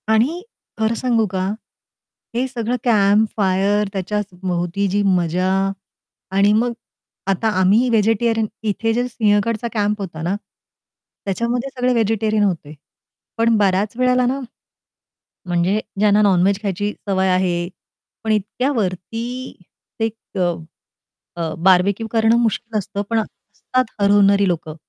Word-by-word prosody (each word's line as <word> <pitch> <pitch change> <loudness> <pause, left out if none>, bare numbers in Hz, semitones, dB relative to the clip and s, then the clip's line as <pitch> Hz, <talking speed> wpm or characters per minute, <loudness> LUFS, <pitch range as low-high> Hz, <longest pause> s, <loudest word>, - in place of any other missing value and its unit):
आणि 250 +11 +2 0.4
खरं 220 +1 +1
सांगू 230 -2 +1
का, 185 -1 -1 0.9
हे 250 +2 +1
सगळं 245 -2 -2
कॅम्पफायर 205 -2 +2
त्याच्या 200 +2 -1 0.2
भोवती 180 +2 -1
जी 205 +2 +1
मजा 180 +1 0 0.9
आणि 200 +1 +4
मग 235 +3 +1 0.6
आता 220 +4 +1
आम्ही 210 +7 +4
व्हेजिटेरियन 225 0 +2 0.2
इथे 225 +2 0
जे 245 +2 0
सिंहगडचा 220 -1 +1
कॅम्प 210 -1 0
होता 170 -5 -6
ना, 175 +4 -1 0.9
त्याच्यामध्ये 235 +6 -1
सगळे 250 0 +2
व्हेजिटेरियन 220 -2 +1
होते. 165 -7 -2 0.6
पण 230 0 +3
बऱ्याच 205 +2 +1
वेळेला 250 0 +3
ना, 260 +3 0 1.1
म्हणजे 175 +3 +1 0.2
ज्यांना 210 0 +4
नॉन-व्हेज 195 0 +3
खायची 205 0 -2 0.2
सवय 190 -1 +2
आहे, 180 -2 +1 0.5
पण 220 - 0
इतक्यावरती 215 -1 -1 0.8
एक 225 -2 -4 1.0
अ, 165 -2 -2
बारबेक्यू 190 +4 +3
करणं 225 0 +3
मुश्कील 230 -1 0
असतं. 200 0 -3
पण 230 -1 +2
असतात 255 +3 -3 0.2
हरवणारी 200 0 +4
लोकं 165 -3 -2
210 Hz, 115 wpm, -20 LUFS, 190-230 Hz, 1.1 s, आणि